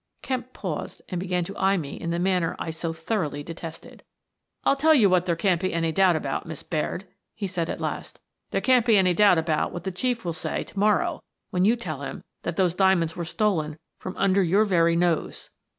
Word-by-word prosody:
" - - -45
Kemp 255 -1 -3
paused 175 -11 -5
and 180 - -2
began 180 -1 -1
to 195 +4 -7
eye 195 +1 +3
me 145 -5 -4
in 170 - -5
the 170 - 0
manner 180 -2 +1
I 165 - -4
so 160 +1 -3
thoroughly 165 -3 -2
detested. 165 0 -9 0.6
"I'll - - +4
tell 310 +3 +5
you 210 -9 +5
what 180 0 +3
there 170 - +2
can't 180 0 +1
be 185 -2 -1
any 165 -1 +1
doubt 185 +1 +4
about, 145 -1 -3
Miss 160 -3 -7
Baird," 165 +4 -2 0.3
he 210 - -4
said, 175 -3 -2
at - - -3
last. - - -5 0.2
" - - -55
There - - -1
can't 255 -2 +4
be 225 -3 +5
any 185 -2 +4
doubt 200 -1 +5
about 160 -1 0
what 175 - -6
the 190 - -2
Chief 235 +4 -2
will 170 - -1
say 160 - -3
to 195 - -8
morrow 205 -4 +2 0.3
when 180 +1 +2
you 225 +4 +5
tell 155 - -5
him 135 - -6 0.2
that 170 - -3
those 180 -2 +2
diamonds 180 -4 +2
were 170 - -4
stolen 160 -5 0 0.2
from 185 - -7
under 195 0 +3
your 195 +4 +3
very 170 -4 +3
nose." 170 -1 0
180 Hz, 225 wpm, -25 LUFS, 165-195 Hz, 0.6 s, tell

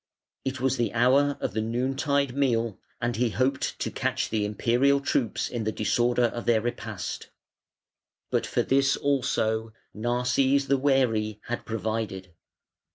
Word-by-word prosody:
It 135 0 -3
was 130 0 +1
the 120 - 0
hour 135 +4 +3
of - - -2
the 110 - 0
noon 120 +4 -1
tide 140 -2 0
meal, 115 -6 +1 0.2
and 120 0 -1
he 120 +2 +1
hoped 130 +4 0
to - - -3
catch - - -1
the 110 -2 0
Imperial 120 +7 +2
troops 130 -4 0
in 120 -2 -3
the 110 - 0
disorder 120 +4 +1
of 120 0 -1
their 115 -2 +4
repast; 110 -5 -5 1.0
but - - +1
for - - 0
this 135 0 +2
also 115 -5 0 0.2
Narses, 125 +4 +1
the 140 - +4
wary, 115 -6 +1
had 120 - -5
provided. 110 -5 -3
120 Hz, 150 wpm, -27 LUFS, 110-135 Hz, 1.0 s, their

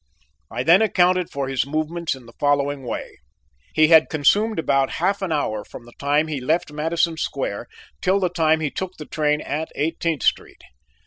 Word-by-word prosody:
I 120 +2 -3
then 170 +8 +6
accounted 180 -4 +2
for 140 -1 -3
his 135 0 -1
movements 155 +1 -2
in 130 -2 -14
the 115 - -15
following 145 -1 +1
way: 125 - -6 0.5
he 155 0 +4
had 160 -2 +6
consumed 205 +9 +2
about 135 -4 +1
half 195 +4 0
an 190 -3 -2
hour 110 -9 -1
from 120 - -12
the 120 - -15
time 145 +2 +2
he 150 -4 -4
left 155 +4 0
Madison 160 +2 0
Square 135 -10 -3 0.3
till 190 +2 +2
the 185 -2 +1
time 160 -2 +2
he 150 -3 -1
took 190 -1 -5
the 150 - -8
train 150 -1 0
at 155 +3 -3
Eighteenth 160 -1 -1
Street. - - -1
155 Hz, 185 wpm, -22 LUFS, 140-170 Hz, 0.5 s, then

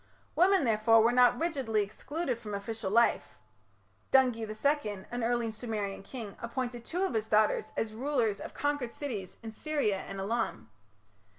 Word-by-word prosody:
Women, 375 0 +5
therefore, 225 -1 +4
were 230 - +4
not 245 0 +5
rigidly 265 -11 0
excluded 260 +5 -4
from 210 -3 -5
official 200 0 -4
life. 235 +4 +2 0.7
Dungi 250 -4 +4
II, 215 -4 -1
an 245 -1 -2
early 235 -1 0
Sumerian 215 -3 -4
king, 215 -1 -8
appointed 240 0 -4
two 355 +9 -2
of 385 - 0
his 220 -1 -1
daughters 215 0 +2
as 220 -1 -1
rulers 240 -4 0
of - - -8
conquered 290 -5 -1
cities 220 -11 -5
in 225 - -6
Syria 280 -5 0
and 195 - -7
Elam. 215 - -2
230 Hz, 155 wpm, -30 LUFS, 215-260 Hz, 0.7 s, Women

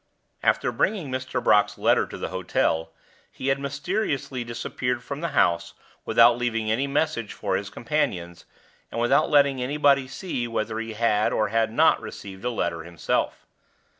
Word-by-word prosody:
After - - +2
bringing 180 -11 -1
Mr. 130 0 -3
Brock's 105 -1 +3
letter - - +3
to - - -8
the - - -4
hotel, 80 -3 0 0.4
he 135 - -3
had 135 0 +1
mysterious 140 +1 -2
disappeared 125 0 -3
from 140 +3 -6
the 170 - -1
house 85 -4 +2 0.3
without 115 +1 +5
leaving 115 -3 -1
any 130 +5 +1
message 140 -6 -1
for - - -2
his - - -3
companions, 85 0 -2 0.5
and - - -3
without 120 +1 +3
letting 140 -3 +4
anybody 140 0 +2
see 130 -3 -4
whether 110 -1 -2
he 115 0 -5
had 110 -1 +2
or 110 -1 +1
had 115 +1 +1
not - - +4
received 95 -2 -9
a 125 - 0
letter 85 -8 -2
himself. 85 -1 -2
120 Hz, 160 wpm, -25 LUFS, 110-140 Hz, 0.5 s, without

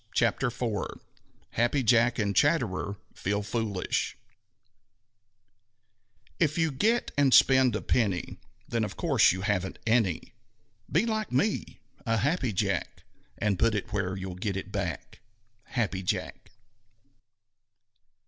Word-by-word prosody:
CHAPTER 115 +3 +2
IV 115 -4 -3 0.5
HAPPY 120 +4 +1
JACK 120 +1 +4
AND 100 -3 0
CHATTERER 110 - +1 0.2
FEEL 100 +2 -2
FOOLISH 105 -3 -2 2.2
If 155 -1 +2
you 165 -2 +2
get 225 - +1
and 140 -2 +4
spend 130 -3 +6
a - - -3
penny, 100 -8 0 0.3
Then 115 -1 -1
of 105 - -5
course 140 - +4
you 95 +2 -3
haven't 95 -2 -1
any. 110 -7 +1 0.6
Be - - +3
like 220 -2 -2
me 210 +1 -1 0.2
a 115 -2 +1
Happy 135 +1 0
Jack 95 - -2 0.3
And 105 -3 0
put 115 -1 +3
it 105 0 -4
where 95 -2 -1
you'll 95 -1 -5
get 95 +1 -3
it 95 - -6
back. - - -4 0.5
_Happy 105 -7 -1
Jack. 90 - -3
115 Hz, 120 wpm, -28 LUFS, 100-130 Hz, 2.2 s, spend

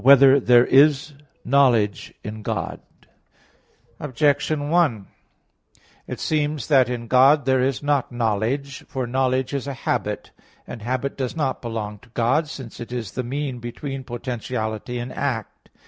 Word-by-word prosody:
1] - - -16
Whether 135 +1 +8
There 120 -1 +5
Is 145 +2 +4 0.3
Knowledge 120 -8 +3
[*Scientia] - - -23
in 110 +1 -6
God? - - -3 1.2
Objection 145 +2 0
1: 150 - +2 1.0
It - - -6
seems 150 -2 -1
that 130 -4 +5
in 120 -1 -4
God 130 +4 +5
there 130 -1 +3
is 135 +1 -1
not 145 -3 +1
knowledge. 120 +4 -1
For 130 -2 -3
knowledge 130 +1 0
is 140 -1 -3
a 140 - -4
habit; - - -3 0.3
and 120 - -8
habit 130 +4 -2
does 130 0 -3
not 140 -5 -1
belong 110 -3 -5
to 120 - -21
God, 130 +7 +2
since 130 -6 -9
it 120 - -8
is 120 -5 -4
the - - -3
mean 130 +1 -4
between 130 +3 -6
potentiality 120 -2 -4
and 120 +1 -5
act. 125 -7 -4
130 Hz, 150 wpm, -23 LUFS, 120-140 Hz, 1.2 s, Whether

